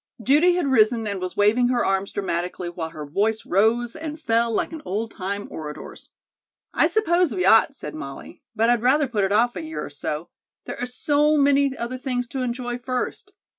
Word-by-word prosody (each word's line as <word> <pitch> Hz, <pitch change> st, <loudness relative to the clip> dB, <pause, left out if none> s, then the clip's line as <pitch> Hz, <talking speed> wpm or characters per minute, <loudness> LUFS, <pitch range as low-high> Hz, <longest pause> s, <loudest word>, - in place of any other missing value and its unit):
Judy 295 Hz, -, +4 dB
had 355 Hz, -3 st, 0 dB
risen 230 Hz, -3 st, +3 dB
and 200 Hz, -3 st, -3 dB
was 185 Hz, 0 st, -5 dB
waving 215 Hz, +4 st, +4 dB
her 245 Hz, -1 st, +1 dB
arms 195 Hz, 0 st, 0 dB
dramatically 180 Hz, -2 st, -3 dB
while 170 Hz, -2 st, -5 dB
her 155 Hz, -2 st, -8 dB
voice 210 Hz, +9 st, 0 dB
rose 230 Hz, +5 st, +2 dB
and 315 Hz, -1 st, -6 dB
fell 230 Hz, -4 st, +1 dB
like 225 Hz, -, -1 dB
an 320 Hz, -2 st, -7 dB
old 220 Hz, +4 st, -3 dB
time 200 Hz, +1 st, -4 dB
orator's. 150 Hz, -1 st, -8 dB, 0.6 s
"I -, -, +4 dB
suppose 350 Hz, -, +1 dB
we 180 Hz, -1 st, 0 dB
ought," 225 Hz, +7 st, +5 dB
said 150 Hz, -, -7 dB
Molly; 140 Hz, +3 st, -9 dB
"but 225 Hz, +1 st, +2 dB
I'd 240 Hz, -2 st, +2 dB
rather 275 Hz, +4 st, +3 dB
put 210 Hz, -5 st, 0 dB
it 195 Hz, -, -2 dB
off 235 Hz, +4 st, +3 dB
a -, -, -4 dB
year 320 Hz, 0 st, -5 dB
or -, -, -10 dB
so. 150 Hz, +3 st, -4 dB, 0.4 s
There -, -, -6 dB
are 245 Hz, -, -1 dB
so 295 Hz, +4 st, +2 dB
many 280 Hz, -1 st, +3 dB
other 245 Hz, +2 st, -4 dB
things 250 Hz, -2 st, -2 dB
to 265 Hz, -, -4 dB
enjoy 245 Hz, 0 st, -3 dB
first. 255 Hz, +10 st, -4 dB
235 Hz, 200 wpm, -23 LUFS, 195-275 Hz, 0.6 s, ought